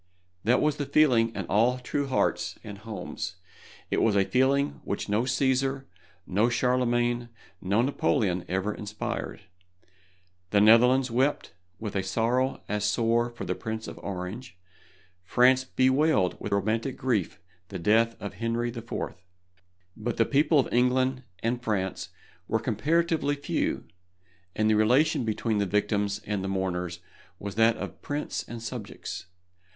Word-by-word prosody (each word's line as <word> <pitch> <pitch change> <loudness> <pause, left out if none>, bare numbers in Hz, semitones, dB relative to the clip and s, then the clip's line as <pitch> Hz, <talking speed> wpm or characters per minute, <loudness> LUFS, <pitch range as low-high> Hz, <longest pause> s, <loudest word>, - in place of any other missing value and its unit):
That 120 +4 +3
was 150 -1 +1
the 145 - -3
feeling 130 -6 +4
in - - -3
all 115 +5 +2
true 140 +3 -2
hearts 130 - 0
and 100 -2 -8
homes. 105 -4 -6 0.6
It - - +2
was 110 -3 +3
a 100 -1 +4
feeling 135 +4 +1
which 100 - -3
no 105 +4 +1
Cæsar, 135 +1 +1 0.4
no 105 +6 +2
Charlemagne, 120 -1 +1 0.3
no 100 +5 +2
Napoleon 110 - +1
ever 95 +3 -1
inspired. 105 +1 -5 1.1
The 100 - +3
Netherlands 125 +4 +5
wept 130 - 0 0.2
with 105 -3 -6
a 95 - +2
sorrow 120 +7 0
as 105 0 -1
sore 115 +3 +2
for 120 - -7
the - - -1
Prince 110 -1 -5
of - - -8
Orange, 95 +5 -6 0.7
France 130 +6 +4
bewailed 130 - +2
with - - -5
romantic 110 +6 0
grief 115 -8 -1 0.3
the - - -6
death 115 +6 +3
of 100 - -6
Henry 115 +4 -1
IV. 115 -1 -9 1.0
But 115 +1 -3
the 115 - +4
people 150 +4 +3
of 130 - 0
England 130 +1 +2 0.2
and 120 +2 0
France 100 -5 -2 0.4
were 110 - +1
comparatively 145 +7 +1
few, 145 - -2 0.7
and 110 - +2
the 110 - +4
relation 125 +5 +3
between 110 0 0
the 100 - +1
victims 105 0 0
and 105 -2 -2
the - - -2
mourners 90 -2 -2 0.4
was 100 -1 -6
that 115 +2 +3
of - - -7
prince 145 +1 -3
and 115 -1 -7
subjects. 110 -6 -6
115 Hz, 145 wpm, -27 LUFS, 105-130 Hz, 1.1 s, Netherlands